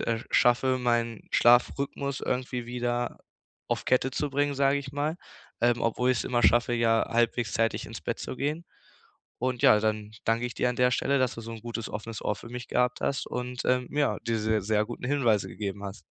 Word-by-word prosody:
äh, 115 -1 0
schaffe, 130 +2 +3
meinen 120 -3 -1
Schlafrhythmus 135 +3 +2
irgendwie 125 -1 -2
wieder 120 0 -2 0.5
auf - - -1
Kette 130 +1 +2
zu 145 +2 -2
bringen, 145 +1 +1
sage 140 +1 +3
ich 135 -1 -7
mal, 145 +4 -2 0.4
ähm, 120 0 +3
obwohl 125 +2 +1
ich 125 - +1
es - - -2
immer 120 -1 0
schaffe, 120 +1 +4
ja, 115 -1 +2
halbwegs 115 0 +1
zeitig 115 0 0
ins - - -8
Bett - - -3
zu - - -5
gehen. 150 +5 -2 0.7
Und 125 -1 -2
ja, 105 - +7
dann 105 -1 -1
danke 115 +2 +1
ich 120 - -7
dir 125 - +1
an 125 - -5
der 125 0 +4
Stelle, 140 +2 +1
dass 130 -2 +1
du - - -7
so 115 +1 -7
'n 115 - -8
gutes 115 -1 -5
offenes 110 +1 -6
Ohr 105 - 0
für 115 - -11
mich 120 0 -7
gehabt 125 0 +1
hast 140 - -1
und, 125 0 -4
ähm, 125 0 +2
ja, 145 -1 +1
diese 110 -1 +1
sehr 105 +1 +1
guten 120 - -7
Hinweise 120 -8 +2
gegeben 100 +1 -5
hast. 100 -1 -7
120 Hz, 205 wpm, -28 LUFS, 115-130 Hz, 0.7 s, ja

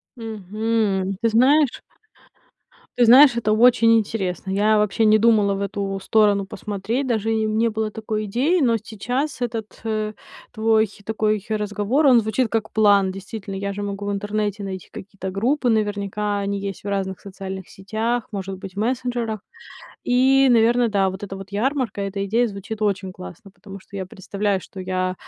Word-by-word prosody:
Мгм. 215 -3 -2
Ты 230 - +3
знаешь 260 +5 +3 1.2
ты 245 - +5
знаешь, 255 +2 +8
это 215 -2 +1
очень 230 0 +5
интересно. 195 -4 -2
Я 210 +2 +3
вообще 210 +1 +1
не 215 0 +6
думала 215 -2 +3
в 195 - -4
эту 200 0 -3
сторону 205 -2 +3
посмотреть. 210 +7 -3
Даже 225 -2 0
и 220 0 0
не 220 +2 +1
было 220 0 -2
такой 215 0 -4
идеи. 265 - +1
Но 240 -6 +3
сейчас 245 +8 -3
этот, 225 -3 -4
э, 215 -1 -2 0.4
твой 220 0 +2 0.2
такой 215 -1 0
разговор, 210 +6 0
он 250 -3 +7
звучит 220 +2 0
как 220 0 -1
план. 200 -3 +4
Действительно, 195 +1 -7
я 200 +1 -3
же 200 +1 -5
могу 200 0 -4
в - - -1
интернете 205 0 -2
найти 190 -2 -6
какие-то 195 -1 -7
группы, 245 +7 0
наверняка 205 -1 -1
они 200 0 -2
есть 195 -1 -6
в 205 - -7
разных 195 -2 -2
социальных 190 -1 -8
сетях, 225 +4 -3
может 195 -1 -4
быть, 190 0 -9
в 200 - -6
мессенджерах. 240 -1 -1 0.7
И, 265 +2 +4
наверное, 235 +1 +4
да, 200 -3 +2
вот 190 +1 -6
эта 195 -1 -6
вот 195 0 -10
ярмарка, 245 -1 -1
эта 195 0 -3
идея 230 +4 +1
звучит 205 +2 -7
очень 195 -2 -1
классно. 90 - -11
Потому 195 0 -11
что 200 +1 -12
я 190 - -3
представляю, 200 +1 -2
что 190 - -10
я 185 0 -2
210 Hz, 170 wpm, -22 LUFS, 195-230 Hz, 1.2 s, знаешь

